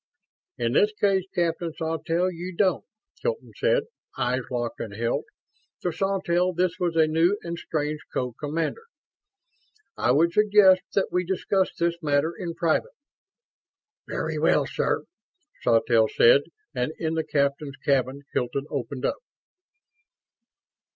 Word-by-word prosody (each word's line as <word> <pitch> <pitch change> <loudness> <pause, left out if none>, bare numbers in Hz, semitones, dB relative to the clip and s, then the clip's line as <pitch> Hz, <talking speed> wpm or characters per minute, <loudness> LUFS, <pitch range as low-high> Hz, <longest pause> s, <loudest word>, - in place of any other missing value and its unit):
"In 115 -1 0
this 210 +8 +4
case, 195 -3 +1
Captain 170 -1 0
Sawtelle, 165 +3 -1
you 175 +1 -7
don't," 190 -4 +2 0.4
Hilton 480 -1 -3
said. - - +2 0.3
Eyes 125 +1 0
locked 120 -2 -3
and 100 -3 -6
held. 115 +2 -1 0.6
To 180 - 0
Sawtelle, 185 -1 0
this 180 +1 0
was 175 -2 0
a 160 -1 +5
new 165 +5 +2
and 170 0 -4
strange 150 -2 -2
co 125 -1 -2
commander. 155 - -3 1.1
"I 120 - 0
would 165 +6 +3
suggest 205 -3 +6
that 195 - +2
we 180 0 +1
discuss 190 +1 0
this 170 0 0
matter 150 +2 +1
in 170 -2 -5
private." 170 - 0 1.1
"Very - - -3
well, - - +3
sir," - - -1 0.6
Sawtelle 115 -1 +3
said; 130 +6 +5 0.3
and 125 +3 -1
in 160 -1 -2
the 160 0 0
captain's 140 -1 -1
cabin 135 0 +1
Hilton 125 +3 -1
opened 135 -1 -3
up. - - 0
165 Hz, 130 wpm, -25 LUFS, 140-185 Hz, 1.1 s, suggest